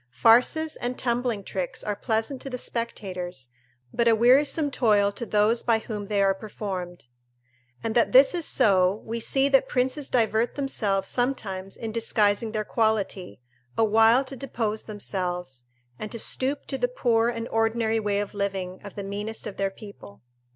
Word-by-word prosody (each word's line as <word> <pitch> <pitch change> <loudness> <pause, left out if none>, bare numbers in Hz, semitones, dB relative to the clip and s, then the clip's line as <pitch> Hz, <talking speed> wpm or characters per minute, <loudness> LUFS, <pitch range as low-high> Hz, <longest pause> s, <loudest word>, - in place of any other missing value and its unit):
Farces 245 - +3
and 245 +1 -4
tumbling 240 -3 -1
tricks 185 -2 -4
are 210 - -2
pleasant 225 +5 -2
to 275 - -5
the 250 - -4
spectators, 185 - -5 0.4
but 235 - +1
a 230 - +6
wearisome 275 +6 +3
toil 210 -5 +3
to 230 +3 -6
those 215 +3 +2
by 230 -2 +2
whom 210 -2 -6
they 200 -1 +1
are 195 0 +3
performed. 190 - -6 0.8
And 225 - -2
that 235 - +3
this 265 +1 +7
is 345 -3 0
so, 190 0 +3
we 230 +1 -3
see 270 +4 +2
that 270 -1 +4
princes 260 +3 0
divert 225 -1 +1
themselves 210 -8 -1
sometimes 200 -7 -2
in 225 -1 -5
disguising 220 -1 +1
their 215 -1 -2
quality, 205 - -1 0.4
awhile 225 +3 +5
to 270 - -7
depose 230 -5 -3
themselves, 180 - -5 0.3
and 215 - -6
to 235 - -5
stoop 265 +5 -2
to 270 - -4
the 245 - +2
poor 235 -2 +1
and 230 -1 -4
ordinary 225 0 +1
way 205 -1 0
of 205 - -6
living 195 -2 -3
of 205 - -10
the 200 - -5
meanest 205 +3 -5
of 205 - -7
their 195 0 0
people. 195 - -13
220 Hz, 165 wpm, -25 LUFS, 200-240 Hz, 0.8 s, this